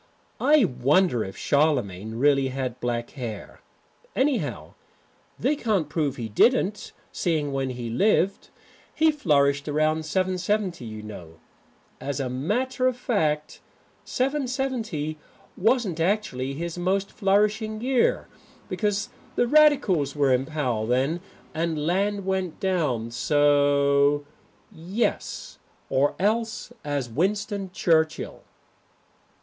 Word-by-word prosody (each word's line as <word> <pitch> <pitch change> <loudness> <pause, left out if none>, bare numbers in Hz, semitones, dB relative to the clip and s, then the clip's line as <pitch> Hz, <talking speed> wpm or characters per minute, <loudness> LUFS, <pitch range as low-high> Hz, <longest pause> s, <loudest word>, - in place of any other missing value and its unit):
I 295 -5 +5
wonder 130 - +2
if 95 - -8
Charlemagne 115 -9 0
really 135 +2 +3
had 130 -2 -4
black 120 -1 -2
hair. 115 -7 -7 0.5
Anyhow, 265 0 -1 0.6
they 300 - +1
can't 210 - 0
prove 145 -3 -1
he 115 -4 -4
didn't, 205 - +2 0.2
seeing 155 -5 -1
when 135 -1 -1
he 120 -2 -5
lived. 195 - +1 0.5
He 315 0 +4
flourished 140 - +2
about 155 +1 +1
770, 185 0 -1
you 110 -1 -7
know. 85 -6 -10 0.6
As 140 -1 -3
a 130 -2 -2
matter 245 - 0
of 255 -1 0
fact 155 -11 -1 0.4
770 255 - -2 0.4
wasn't 220 -5 +1
actually 165 -8 -1
his 170 +3 -4
most 190 +2 0
flourishing 210 +2 +1
year 250 +1 +1 0.4
because 210 -1 -1 0.3
the - - +3
Radicals 240 - +4
were 140 -3 +3
in 130 +1 0
power 125 -9 -1
then 135 +8 +1 0.3
and 160 -2 -1
land 200 +3 0
went 190 -3 -2
down 150 - 0
so. 145 +2 +3 0.5
Now - - -18
771 175 +4 -10
Yes. 235 - -2 0.3
Or 140 +2 +2
else 220 +3 -1
as 145 -4 -2
Winston 195 - -1
Churchill. 160 -3 +1
160 Hz, 115 wpm, -25 LUFS, 135-205 Hz, 0.6 s, I